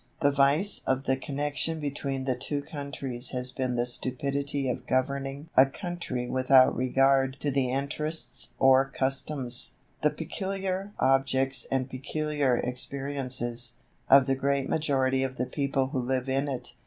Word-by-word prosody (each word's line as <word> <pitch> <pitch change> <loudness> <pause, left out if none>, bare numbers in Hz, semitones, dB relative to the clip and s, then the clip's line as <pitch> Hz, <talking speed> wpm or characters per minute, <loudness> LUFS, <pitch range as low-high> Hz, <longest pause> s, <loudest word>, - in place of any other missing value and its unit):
The 145 - +4
vice 140 +8 +3
of 130 0 +1
the 130 - +2
connection 145 +3 -2
between 140 -2 -3
the 130 -1 0
two 145 +3 -3
countries 140 -4 -4
has 125 0 0
been 130 -1 -2
the 120 0 +1
stupidity 140 +3 -1
of 125 0 -3
governing 140 +3 -1
a 130 - +7
country 155 -6 -4
without 130 0 +5
regard 135 +1 +2
to 145 - 0
the 135 -2 +1
interests 140 0 -2
or 135 0 +5
customs, 135 -2 -1 0.3
the 150 - +4
peculiar 190 +4 -3
objects 135 -1 +1
and 130 -1 0
peculiar 140 0 -1
experiences, 125 -2 -2 0.3
of 135 -1 +8
the 135 - +1
great 140 0 0
majority 135 -4 +1
of 130 0 -2
the 125 - -1
people 135 0 -1
who 135 -2 -2
live 130 +1 -1
in 135 +2 0
it. 130 -3 -5
135 Hz, 145 wpm, -28 LUFS, 130-140 Hz, 0.3 s, of